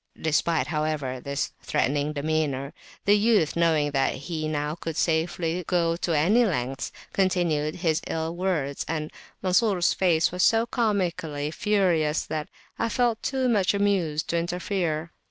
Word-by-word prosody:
Despite, 160 +1 +1
however, 150 -5 -2
this 140 +2 -3
threatening 145 +3 0
demeanour, 145 -2 -1 0.3
the 205 - +6
youth, 210 -6 +3
knowing 160 -3 +2
that 135 -1 +1
he 155 +2 -4
now 150 -1 -2
could 165 -1 -6
safely 165 +1 0
go 170 -2 +2
to 170 -2 0
any 205 +11 +4
lengths, 135 - -2 0.2
continued 170 -6 +1
his 165 -3 0
ill 160 +1 -2
words, 170 -7 -1
and 155 -1 -3 0.3
Mansur's 185 -1 +3
face 170 -4 +2
was 180 +1 -2
so 225 +3 +4
comically 175 - -1
furious, 170 -6 +1
that 155 -1 -4 0.3
I 230 - +1
felt 235 -1 +1
too 265 -2 0
much 205 -5 +2
amused 185 -7 +1
to 170 - +1
interfere. 170 -2 -2
165 Hz, 140 wpm, -26 LUFS, 150-185 Hz, 0.3 s, the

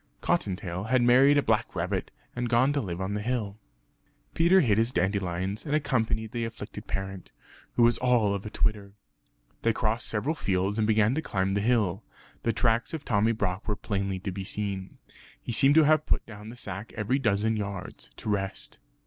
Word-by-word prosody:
(Cottontail 95 -1 -1
had 125 +2 +2
married 130 +4 +6
a 145 - +3
black 110 -2 0
rabbit, 90 +2 -2 0.3
and 120 -1 -2
gone 130 +4 +3
to 145 - 0
live 90 -6 -5
on 95 +1 -2
the 105 - -2
hill). 110 -3 -2 0.7
Peter 175 +3 +5
hid 110 - +3
his 115 +2 +2
dandelions, 95 0 -1
and 150 -1 -1
accompanied 110 -7 0
the 120 -1 -2
afflicted 115 0 -7
parent, 95 -1 -5 0.4
who 120 - +4
was 120 +1 +4
all 120 -5 +3
of 100 -1 -3
a 105 - -6
twitter. 105 -2 -1 0.7
They 115 - +2
crossed 110 -1 -1
several 115 +8 -1
fields 100 - -1
and 105 - +2
began 110 +1 +3
to 155 - -1
climb 95 -8 -1
the 100 - +1
hill; 105 -4 +1 0.4
the 115 - +1
tracks 115 +5 +1
of 155 - -8
Tommy 110 -2 +2
Brock 100 -3 -2
were 105 - 0
plainly 100 -2 -2
to 95 - -3
be 95 +1 -5
seen. 100 -1 -4 0.4
He - - -6
seemed 135 +4 +5
to 160 - +7
have 155 0 +3
put - - +1
down 105 -1 -10
the 120 - -9
sack 100 -1 -7
every 120 +5 +1
dozen 110 -2 +1
yards, 100 -3 -6
to - - -5
rest. 95 -1 -3
110 Hz, 190 wpm, -27 LUFS, 100-120 Hz, 0.7 s, to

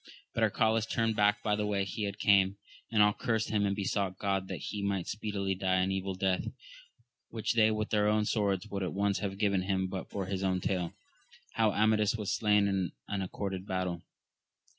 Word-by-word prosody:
But - - -2
Arcalaus 110 0 +2
turned 115 -1 +1
back 105 0 +3
by 105 -1 +2
the 105 0 -1
way 100 -1 0
he 100 +1 -3
came, 100 -1 +3 0.3
and 105 -2 +5
all 105 0 +4
cursed 110 -1 -1
him 105 -2 +2
and 100 - 0
besotight 100 -2 -1
God 95 -2 -1
that - - -4
he 105 - -5
might 100 -3 -1
speedily 100 -2 -2
die 95 0 0
an 95 +1 +2
evil 95 0 -2
death, 95 0 0 0.8
which 110 +1 -1
they 110 -2 +5
with 110 0 -2
their 105 -1 +3
own 105 0 +2
swords 100 -3 0
wo 100 -2 -4
aid - - -2
at 90 - -3
once 100 0 +1
have 95 -2 -3
given 100 -2 +2
him 95 0 0
but 95 0 -5
for 100 -2 -3
his 95 0 -3
own 95 -1 +1
tale, 90 -2 -2 0.6
how 110 -2 +3
Amadis 105 +1 +3
was 105 -3 -3
slain 105 -2 +3
in 95 -3 -1
an 100 -1 -2
accorded 95 0 -4
battle. 90 -2 -2
100 Hz, 205 wpm, -31 LUFS, 95-105 Hz, 0.8 s, and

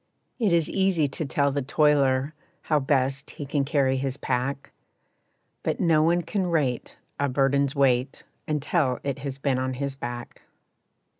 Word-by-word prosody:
It 215 -6 +2
is 170 -2 +3
easy 190 -6 +2
to 155 +3 -4
tell 140 +1 +1
the 140 +1 -1
toiler 140 0 +2 0.3
How 155 -2 +2
best 135 0 0
he 145 - -7
can 140 0 0
carry 135 -2 +1
his 135 0 -2
pack, 135 +2 -2 0.9
But - - -2
no 160 -3 +4
one 170 +2 +2
can 185 +2 -1
rate 145 -8 -1 0.2
a 140 0 +1
burden's 140 +1 +1
weight 130 -1 +1 0.2
Until 150 -3 0
it 140 -1 -3
has 135 -1 -5
been 135 -2 0
on 130 0 -2
his 140 +1 -3
back. 120 -2 -7
140 Hz, 155 wpm, -25 LUFS, 130-150 Hz, 0.9 s, no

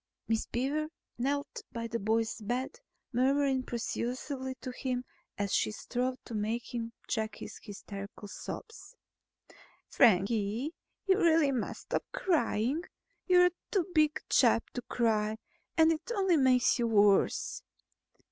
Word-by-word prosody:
Miss 225 -1 0
Beaver 280 +6 -1 0.3
knelt 285 +3 -1
by 230 -1 -4
the 230 0 -2
boy's 220 +2 0
bed, 255 - -3 0.3
murmuring 265 +2 +2
persuasively 255 +2 -3
to 255 - -5
him 250 0 -3 0.3
as 200 -1 -1
she - - +2
strove 250 +4 -2
to 235 - -8
make 225 +4 -2
him 230 -1 -3 0.2
check 220 -2 -1
his - - -9
hysterical 200 -1 -8
sobs. 450 - -8 0.9
"Frankie, 220 - +3 0.3
you 385 0 +4
really 325 -5 +4
must 250 -4 -3
stop - - -2
crying. 300 - +1 0.5
You're 360 -1 +6 0.2
too 380 -5 +1
big 305 -1 +4
a - - -5
chap 230 -2 +4
to 245 - -4
cry 220 -3 0 0.4
and 320 0 +6
it 325 +7 -3
only 385 -4 +3
makes 255 -3 +4
you 235 - +2
worse. 210 - +3
250 Hz, 130 wpm, -31 LUFS, 225-295 Hz, 0.9 s, You're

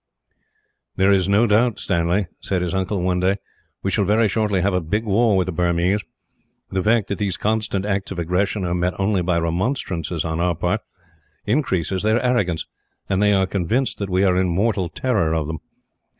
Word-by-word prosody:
"There 95 +1 +3
is 95 -1 +2
no 105 +4 +4
doubt, 115 +1 +2
Stanley," 90 +2 0
said 95 -2 -2
his 90 0 -2
uncle 95 0 -1
one 90 0 +1
day, 95 +2 +2 0.5
"we 95 - 0
shall 100 - +2
very 105 +3 +3
shortly 105 -2 0
have 100 +1 +1
a 90 - +1
big 105 +8 -2
war 110 0 +3
with 90 - +2
the 95 - -3
Burmese. 90 +4 +1 0.7
The 95 - 0
fact 110 +1 +2
that 100 - -3
these 100 -4 -1
constant 105 -2 -1
acts 100 -1 -1
of 95 - -6
aggression 90 +4 0
are 85 - -1
met 90 +1 -1
only 100 -1 +1
by 85 0 +1
remonstrances, 85 - -2
on 80 0 -2
our 85 0 +1
part, 90 +6 -1 0.6
increases 95 - 0
their 110 +2 +2
arrogance; 100 -10 +1 0.4
and 95 0 +1
they 105 0 +4
are 95 -1 +3
convinced 100 +8 -1
that 100 -1 -3
we 95 +1 +2
are 90 -2 +3
in 95 0 +2
mortal 95 0 0
terror 100 -11 0
of 80 -2 0
them. 80 +1 -5
95 Hz, 195 wpm, -21 LUFS, 90-105 Hz, 0.7 s, no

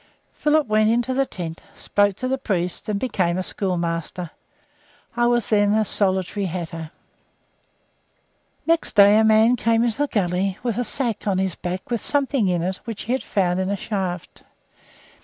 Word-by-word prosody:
Philip 300 0 +2
went 215 0 +3
into 240 +3 +1
the 270 +1 +1
tent, 165 -3 -6
spoke 205 -1 +1
to 255 - -4
the 265 +1 -1
priest, 180 -6 -2
and 205 -1 0
became 185 -8 0
a 185 - -1
schoolmaster. 175 -2 -3 0.8
I 240 0 +2
was 240 -2 +1
then 205 -1 +3
a 220 0 +2
solitary 190 0 0
"hatter." 165 -2 -5 1.8
Next 330 0 +1
day 205 +1 +7
a - - +4
man 220 +2 +5
came 230 +1 +2
up 235 - +1
the 290 +6 -1
gully 190 -3 -1
with 240 -2 -1
a - - +1
sack 235 -3 -2
on 195 -2 +1
his 190 -2 0
back 180 +7 -6
with 235 - 0
something 275 -6 +1
in 175 -2 0
it 185 +2 -2
which 230 -4 -7
he 235 - -4
had 260 - +1
found 185 -3 0
in 190 0 -1
a 200 - -1
shaft. 185 -4 -4
205 Hz, 175 wpm, -22 LUFS, 185-235 Hz, 1.8 s, day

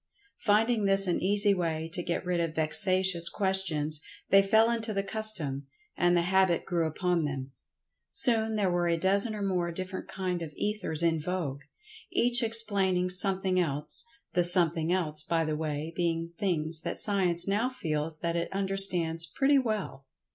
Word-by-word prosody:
Finding 215 +1 +1
this 195 0 +3
an 180 - -1
easy 205 +2 +3
way 165 -3 -3
to 180 - -2
get 175 +1 -4
rid 180 -1 -2
of 165 -2 -3
vexatious 175 +2 +2
questions, 170 -7 -1 0.3
they 195 - +6
fell 220 +4 +2
into 225 -2 -3
the 195 - -1
custom—and 175 - -1
the 170 - +1
habit 190 -1 +1
grew 170 -3 -1
upon 175 +1 -2
them. 135 -2 -6 0.6
Soon 225 -3 +4
there 200 -4 0
were 175 0 -1
a 170 -1 0
dozen 200 +5 +1
or 205 - -5
more 180 -3 -2
different 185 +2 -7
kind 180 -2 -4
of 155 -3 -8
Ethers 205 -6 -2
in 165 -1 +1
vogue, 155 -4 -5 0.5
each 240 0 +1
explaining 200 -6 +3
something 185 0 +1
else—the 175 +6 -2
"something 170 -2 +4
else," 155 -5 0
by 165 +1 -2
the 155 0 -3
way, 155 +1 -5
being 165 -1 -3
things 165 -5 +1
that - - -4
Science 180 -4 +3
now 210 +5 -1
feels 155 - -4
that 170 -1 -2
it 170 - -3
understands 190 -4 +2
pretty 275 - +1
well. 210 - -5
180 Hz, 160 wpm, -27 LUFS, 165-200 Hz, 0.6 s, they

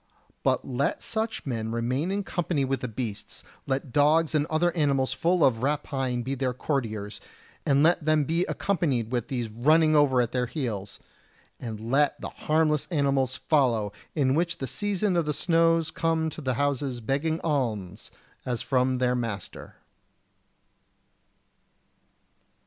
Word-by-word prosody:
But - - 0
let 140 +5 -1
such 220 0 -2
men 115 -4 -3
remain 125 +8 -1
in 200 +1 -1
company 170 -7 -1
with 135 0 -1
the 125 - -4
beasts; 110 -3 -6 0.2
let 135 -1 -2
dogs 155 +3 +3
and 150 0 +1
other 170 +3 +1
animals 140 -4 +1
full 175 -1 +2
of 115 -4 +2
rapine 135 -3 -1
be 130 +3 -3
their 130 -2 -1
courtiers, 110 -7 -3 0.5
and 140 0 +4
let 170 0 +3
them 155 0 +3
be 165 +5 0
accompanied 145 - -1
with 120 -2 -1
these 120 -3 -2
running 155 +7 +4
ever 140 -4 +4
at 120 -1 +1
their 125 -1 0
heels! 105 -8 -4 0.6
and 115 -1 -6
let 145 +1 +2
the - - -5
harmless 155 -1 +1
animals 140 -5 +1
follow, 120 -11 +1 0.2
which 155 +4 +2
in - - -30
the 135 - -2
season 205 - -1
of 170 -2 +2
the 150 -1 -1
snows 165 -1 +2
come 160 -1 0
to 155 - -8
the 130 -3 -1
houses 140 -3 -1
begging 140 +7 -1
alms 110 - -2 0.3
as 125 -2 -2
from 130 -1 +1
their 125 0 +2
master. 115 -7 -5
135 Hz, 150 wpm, -27 LUFS, 125-160 Hz, 0.6 s, and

